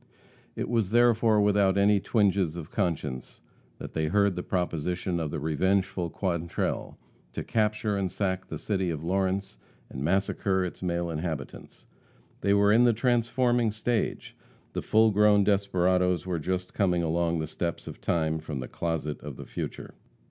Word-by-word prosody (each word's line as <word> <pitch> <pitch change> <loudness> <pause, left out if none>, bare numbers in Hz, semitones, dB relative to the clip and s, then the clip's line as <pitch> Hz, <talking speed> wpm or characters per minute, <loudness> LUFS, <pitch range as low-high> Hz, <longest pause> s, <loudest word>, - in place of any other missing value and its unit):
It - - -3
was 115 -5 0
therefore 115 -1 +4
without 100 -2 +3
any 100 +1 +4
twinges 100 -6 +1
of 85 -2 -7
conscience 75 - -3 0.4
that - - -8
they 80 -1 0
heard 100 +2 +2
the 90 - -3
proposition 90 0 -2
of 80 -2 -2
the - - -4
revengeful 90 +3 0
Quantrell, 85 -2 -2 0.4
to - - -4
capture 105 -1 0
and 95 -2 -1
sack 95 -1 -2
the - - -5
city 95 -4 -1
of 80 -2 -4
Lawrence 95 -4 -1 0.3
and 65 - -5
massacre 95 +2 +1
its 90 - -7
male 85 -1 -1
inhabitants. 80 -1 -6 0.5
They 100 0 +2
were 100 0 +4
in 115 +3 +5
the 120 - +5
transforming 120 0 +2
stage, 110 +2 -2 0.4
the - - -2
full 110 0 +4
grown 105 0 +5
desperadoes 90 -3 +2
were 90 -3 -2
just 90 +3 -3
coming 90 -4 +1
along 85 +1 0
the 80 - -2
steps 85 +2 -4
of - - -9
time 80 -1 0
from 75 -3 -5
the 65 - -5
closet 80 -3 -3
of 75 -3 -7
the - - -8
future. - - -6
95 Hz, 160 wpm, -27 LUFS, 85-105 Hz, 0.5 s, in